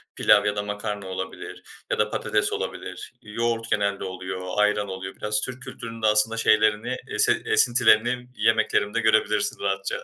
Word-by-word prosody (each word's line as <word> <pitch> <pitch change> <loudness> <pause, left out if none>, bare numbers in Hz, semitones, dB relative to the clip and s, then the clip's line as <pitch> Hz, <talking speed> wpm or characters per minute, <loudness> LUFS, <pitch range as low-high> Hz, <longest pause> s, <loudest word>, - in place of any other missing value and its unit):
pilav 105 -1 +4
ya 105 0 0
da 105 - -2
makarna 105 -1 -5
olabilir 95 0 -7 0.3
ya - - 0
da - - +2
patates - - -1
olabilir. - - -6
Yoğurt 115 +1 -2
genelde 100 -1 0
oluyor, 95 0 -6
ayran 105 0 +2
oluyor. 95 0 -6
Biraz 105 0 -1
Türk 130 0 -5
kültürünün 115 -1 -8
de 110 - +3
aslında 105 +2 +2
şeylerini 110 +2 +2
esin - - +1
esintilerini 120 0 +3
yemeklerimde 110 -1 +1
görebilirsin 105 -2 +2
rahatça. 100 0 -2
105 Hz, 150 wpm, -24 LUFS, 100-115 Hz, 0.3 s, pilav